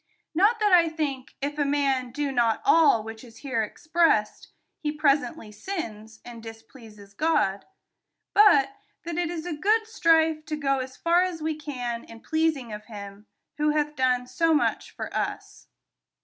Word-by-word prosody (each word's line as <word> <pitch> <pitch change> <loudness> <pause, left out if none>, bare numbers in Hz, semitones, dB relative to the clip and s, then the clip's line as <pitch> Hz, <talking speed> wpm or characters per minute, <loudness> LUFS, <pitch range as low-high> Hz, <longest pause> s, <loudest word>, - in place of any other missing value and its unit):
Not 410 +7 +3
that 420 -2 +2
I 340 -2 +6
think, 285 -5 -4
if 290 +1 -3
a - - +3
man 275 -3 0
do 285 +3 -3
not 235 -4 +1
all 320 - +5
which 225 +1 -9
is 230 -2 -14
here 245 -5 0
expressed, 305 -2 0 0.3
he 300 - -2
presently 300 -4 0
sins, 220 - -7
and 235 -1 -10
d'spleases 225 -2 -13
God; 200 -10 +1 0.7
hut 405 -3 +5 0.3
that 340 -1 -5
it 345 -2 -1
is 335 -1 -5
a 350 - -3
good 425 +8 +1
strife 320 -6 +2
to 305 - -2
go 275 -2 0
as 260 0 -6
far 340 +1 +3
as 365 -3 -2
we 315 0 0
can 250 -6 -5
in 230 0 -13
pleasing 315 -8 -1
of 210 0 -8
him, 205 -1 -10 0.3
who 300 0 +2
hath 300 0 -1
done 255 -2 +1
so 315 +6 +1
much 295 - 0
for - - -7
us. - - -4
285 Hz, 165 wpm, -26 LUFS, 230-325 Hz, 0.7 s, I